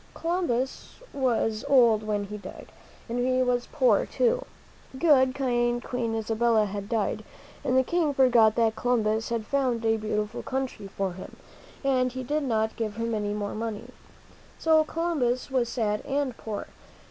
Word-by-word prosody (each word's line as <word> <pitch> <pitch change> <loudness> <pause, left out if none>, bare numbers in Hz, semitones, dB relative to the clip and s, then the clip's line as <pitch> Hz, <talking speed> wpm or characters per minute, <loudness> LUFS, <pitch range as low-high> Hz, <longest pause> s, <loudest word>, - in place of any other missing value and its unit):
Columbus 330 -7 -2 0.2
was 235 -5 0
old 240 -6 +5
when 210 -1 -1
he 210 +1 -6
died, 190 - -10 0.4
and 240 +1 -3
he 255 +1 +2
was 245 -1 0
poor, 250 -8 +3
too. - - +1 0.5
Good, 260 -4 +4
kind 240 -2 0
Queen 235 -3 -2
Isabella 225 0 +2
had 200 0 -5
died, 225 -4 -1 0.4
and 255 0 +1
the 260 - +5
King 330 +1 +1
forgot 240 -5 +4
that 225 -1 +2
Columbus 220 -2 0
had 230 -2 -2
found 250 -3 0
a 225 0 +3
beautiful 210 0 -2
new - - -7
country 265 -6 -4
for 195 -1 -3
him, 185 - -10 0.5
and 255 -2 +2
he 260 0 -4
did 295 +5 -1
not 220 -5 0
give 215 -3 -3
him 230 +1 -2
any 210 -1 -1
more 205 -1 -3
money. 220 -1 -5 0.7
So 315 -1 +4
Columbus 295 -7 -1
was 250 -3 +1
sad 210 -4 -1
and 275 -3 -1
poor. 215 -3 -5
240 Hz, 160 wpm, -27 LUFS, 220-260 Hz, 0.7 s, old